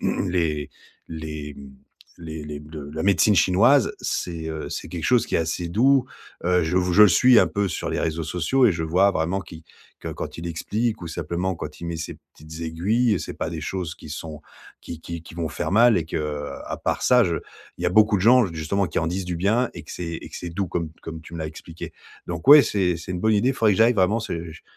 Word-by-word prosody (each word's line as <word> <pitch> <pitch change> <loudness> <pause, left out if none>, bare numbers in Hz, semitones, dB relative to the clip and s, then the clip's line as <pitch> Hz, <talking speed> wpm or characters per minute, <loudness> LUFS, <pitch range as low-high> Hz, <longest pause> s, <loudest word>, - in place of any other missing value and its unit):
les 85 -6 -1 0.4
les, 75 -2 -6
mmh, 70 -1 -11 0.5
les 80 -2 -7
les 75 -1 -6
le 75 -2 -8
la 80 +1 -3
médecine 100 +2 +4
chinoise, 105 - +4
c'est 85 -2 -3
heu, 80 -1 -5
c'est - - -5
quelque 85 -3 -5
chose 125 +3 +3
qui - - -4
est - - +2
assez 80 +2 -2
doux. 130 +7 +3 0.4
Heu, 90 0 +3
je 80 +3 -1
vous 90 0 0
je 105 - +8
le 105 - +9
suis 125 +5 +6
un - - +5
peu 100 -1 -1
sur - - -4
les - - -1
réseaux 80 +1 -1
sociaux 90 - +1
et 110 - +4
je 85 -1 -3
vois 90 +5 +3
vraiment 90 +2 -1
qui 80 -3 -12 0.4
que, - - -6
quand - - -6
il 85 - -5
explique 105 +6 -2
ou 85 - -6
simplement 85 +3 -3
quand 75 -3 -8
il - - -6
met 85 0 -3
ses 80 - -6 0.2
petites 80 +1 -11
aiguilles, 100 +6 +1
c'est - - -6
pas - - -3
des 80 -1 -5
choses 90 -1 -4
qui 80 - -13
sont 75 0 -7 0.4
qui 85 - -8
qui 85 -1 -6
qui 85 - -13
vont 85 -2 -3
faire - - -3
mal. 115 +1 +6
Et 80 - -2
que, 75 -2 -3 0.2
à - - -4
part - - -2
ça, 125 -1 +5
je 85 -2 0 0.4
il - - -7
y - - +3
a - - +2
beaucoup 105 +2 +5
de 95 - -2
gens, 120 +2 +6
justement, 80 +5 -1
qui 75 - -2
en 80 - -1
disent 90 +3 -2
du 90 -1 -3
bien 110 +8 +1
et 85 - -8
que - - -9
c'est 85 -2 -5
et - - -8
que - - -8
c'est 90 - -6
doux 95 +2 -3
comme 85 0 -2
comme 80 0 -7
tu 85 - -12
me - - -6
l'as 80 - -3
expliqué. 80 +2 -9 0.3
Donc 85 +5 -5
ouais, 145 0 +11
c'est 90 -4 0
c'est 85 +3 -7
une 90 - -4
bonne 110 +2 +3
idée. 120 +5 +3
Il - - -3
faudrait 110 -3 +3
que - - -3
j'aille, 115 +2 +6
vraiment, 100 +3 +2
c'est 85 -6 -5
j - - -14
85 Hz, 250 wpm, -23 LUFS, 80-100 Hz, 0.5 s, ouais